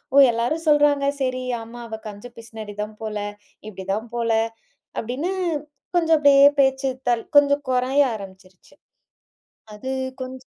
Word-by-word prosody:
ஓ - - +5
எல்லாரும் 245 +9 -1
சொல்றாங்க 290 -1 +4
சரி 255 -1 -1 0.2
ஆமா, 230 +2 -10
அவ 220 -1 -6
கஞ்ச 205 +2 -9
பிசுனாரி 220 -2 -9
தான் 215 0 -9
போல! 215 -1 -3 0.5
இப்டிதான் 195 +3 -4
போல, 230 -1 0 0.7
அப்டின்னு 260 +11 -3 0.6
கொஞ்சம் 325 -2 +4
அப்படியே 280 -1 +7 0.2
பேச்சு 265 0 +2 0.2
தள் 235 -2 +1
கொஞ்சம் 285 0 +4
குறைய 255 +3 +3
ஆரம்பிச்சுருச்சு. 190 -2 -13 1.0
அது 260 +6 -6 0.3
கொஞ்ச 255 0 -7
250 Hz, 125 wpm, -23 LUFS, 215-280 Hz, 1.0 s, அப்படியே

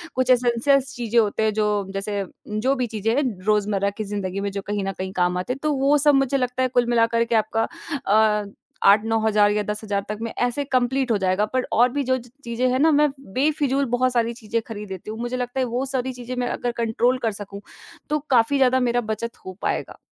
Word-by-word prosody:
कुछ 255 0 0
एंसेस 255 +3 +2
चीजें 235 -1 +1
होते 215 0 +1
हैं 215 - +2
जो 210 0 +1 0.2
जैसे 200 0 -2 0.3
जो 220 +6 +1
भी 255 -2 -1
चीजें 220 0 -1
हैं 285 - +2 0.2
रोज़मर्रा 205 -2 +1
की 215 - -2
जिंदगी 200 -2 -4
में 200 - -1
जो 200 0 -4
कहीं 205 -1 -1
न 195 - -2
कहीं 190 0 -5
काम 180 -1 +1
आते 185 +7 -2
हैं 270 - -9
तो 305 - +2
वो 280 +2 +3
सब 295 +1 +4
मुझे 275 0 +2
लगता 250 0 -1
है 255 - +3
कुल 245 -1 +3
मिला 230 -1 +4
कर 230 0 +1
के 235 0 0
आपका 225 +1 +1 0.5
अ 215 -1 +4 0.5
8-9000 215 0 +3
या 210 0 0
10000 210 -1 -3
तक 210 - -3
में 230 0 -3
ऐसे 245 +4 0
कंप्लीट 260 -1 +1
हो 210 - +3
जाएगा 190 +2 +1
पर 255 0 +1
और 240 +3 +4
भी 285 - 0
जो 260 0 +1
ची 245 -1 -12
चीजें 240 +2 -1
हैं 255 - +1
ना 320 +2 +5
मैं 295 0 +4 0.2
बेफ़िज़ूल 280 0 +1
बहुत 250 +1 +1
सारी 235 -1 +1
चीजें 230 -1 -3
खरीद 210 -3 -7
लेती 190 +2 -7
हूँ। 220 - -7
मुझे 240 +1 -3
लगता 250 +1 -3
है 260 - +2
वो 250 +3 -2
सारी 260 -1 -2
चीजें 250 0 -7
मैं 245 0 -1
अगर 245 - -2
कंट्रोल 235 +2 +1
कर 225 - +1
सकूँ, 200 0 -8 0.5
तो 300 0 +1
काफ़ी 250 +2 +3
ज़्यादा 260 -1 +4
मेरा 245 -1 +1
बचत 225 +1 -4
हो 185 - -6
पाएगा। - - -2
235 Hz, 230 wpm, -23 LUFS, 210-255 Hz, 0.5 s, ना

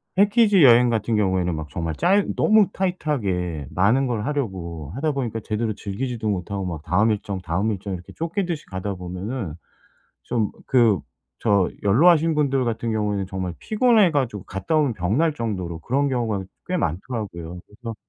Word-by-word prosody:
패키지 205 -1 +5
여행 120 -1 +7
같은 115 0 0
경우에는 95 -4 +1
막 80 -1 -6
정말 80 +3 -3
짧 195 +4 +3
너무 215 -2 +5
타이트하게 100 - -1
많은 110 +9 +3
걸 115 -4 -2
하려고 90 - -4
하다 150 +3 0
보니까 120 -5 -2
제대로 110 +1 -2
즐기지도 110 +3 -4
못하고 95 0 -2
막 85 -4 -5
다음 105 +7 +2
일정, 100 -2 -3
다음 95 +5 -1
일정 100 -1 -4
이렇게 90 0 -11
쫓기듯이 170 -1 -3
가다 95 +1 -4
보면은 90 - -5 0.7
좀 110 -4 0 0.2
그 115 - +4 0.4
저 100 -5 +3
연로하신 160 - +5
분들 135 -3 +1
같은 115 0 -2
경우에는 105 -2 -1
정말 95 -1 -4
피곤해 215 -5 +3
가지고 125 - -1
갔다 95 - -2
오면 145 -6 +2
병 95 +5 0
날 160 -1 +2
정도로 95 - -4
그런 140 - 0
경우가 115 -6 -1 0.2
꽤 180 - -1
많더라고요. 90 - -4
그래서 115 +2 -8
110 Hz, 365 characters per minute, -23 LUFS, 95-140 Hz, 0.7 s, 여행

